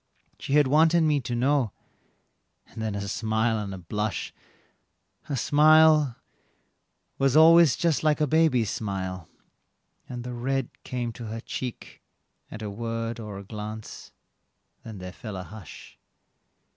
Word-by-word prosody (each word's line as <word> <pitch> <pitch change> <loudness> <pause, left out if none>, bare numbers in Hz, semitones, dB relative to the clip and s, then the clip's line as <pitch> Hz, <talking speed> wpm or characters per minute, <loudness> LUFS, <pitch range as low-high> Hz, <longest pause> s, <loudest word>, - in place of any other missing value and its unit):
"She 140 - -4
had 150 0 +5
wanted 160 +5 +4
me 150 -2 +2
to 120 -2 -4
know," 130 -3 +1 0.9
and 110 - -10
then 110 -2 -2
a 100 0 -4
smile 110 +1 0
and 100 -2 -5
a 95 - -6
blush; 105 +4 -3 0.9
Her 140 - -3
smile 155 0 +5 1.0
was 135 +1 +3
always 165 -3 +7
just 165 -3 0
like 155 -2 +2
a 150 - +3
baby's 145 -8 +2
smile, 95 -4 -4 0.8
and 125 -1 -6
the 125 0 -6
red 130 +1 -2
Came 120 -2 -3
to 115 +1 -9
her 110 +1 -5
cheek 125 +1 -7 0.5
at 110 - -8
a 105 - -4
word 115 +2 -4
or 105 -3 -7
a 100 - -8
glance 105 +1 -8 0.7
then 110 -2 -9
there 90 -1 -8
fell 110 -2 -8
a 95 - -5
hush. 100 -3 -12
120 Hz, 145 wpm, -26 LUFS, 105-145 Hz, 1.0 s, always